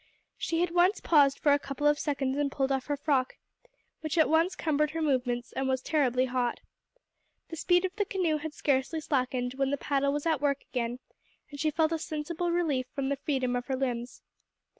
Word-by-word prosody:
She 330 0 -1
had 355 - +1
once 355 +4 +3
paused 285 -4 +4
for 290 - +3
a 285 - +3
couple 275 +1 -5
of 295 0 +4
seconds 275 -3 -1
and 285 -1 0
pulled 270 0 0
off 265 -1 -1
her 290 -1 -1
frock, 275 -3 0 0.6
which 310 0 -3
at 315 - +5
once 325 +4 +2
cumbered 300 -1 +1
her 325 +2 -4
movements 250 -4 0
and 265 0 -2
was 260 0 +1
terribly 255 -3 +1
hot. 250 -2 -1 0.9
The 330 - -6
speed 355 +3 +2
of 375 +1 -4
the 410 - +1
canoe 360 -6 0
had 305 0 -6
scarcely 275 +3 0
slackened 255 -4 -1
when 270 -1 +1
the 285 - 0
paddle 280 0 0
was 290 +2 -3
at 315 -4 +1
work 280 -1 0
again, 240 -1 -2 0.5
and 285 - -9
she 310 - +2
felt 315 +1 +1
a 325 - -1
sensible 320 +3 -3
relief 300 -7 0
from 275 -2 -1
the 280 - +1
freedom 260 -3 -1
of 245 0 -3
her 265 - 0
limbs. 250 -2 -3
285 Hz, 205 wpm, -29 LUFS, 260-315 Hz, 0.9 s, at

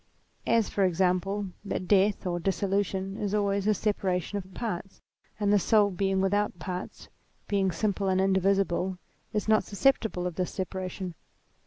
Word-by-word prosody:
As, 230 -2 +3
for 200 - 0
example, 190 +2 +1
that 185 -3 -3
death, 200 +1 +3
or 175 -1 -1
dissolution, 195 +1 -1
is 205 -1 -1
always 200 -1 +1
a 215 - +5
separation 190 -2 -1
of 190 0 -11
parts; 195 -2 -5 0.4
and 205 -1 +2
the 205 - +5
soul 205 +1 +4
being 190 +1 0
without 205 0 +1
parts, 180 0 -6 0.4
being 195 -2 +1
simple 200 +2 -1
and 190 0 +2
indivisible, 190 -1 +2 0.3
is 210 -1 -2
not 215 0 +4
susceptible 215 -4 +1
of 180 -2 -4
this 180 -1 0
separation. 185 -1 -4
195 Hz, 150 wpm, -28 LUFS, 185-205 Hz, 0.4 s, a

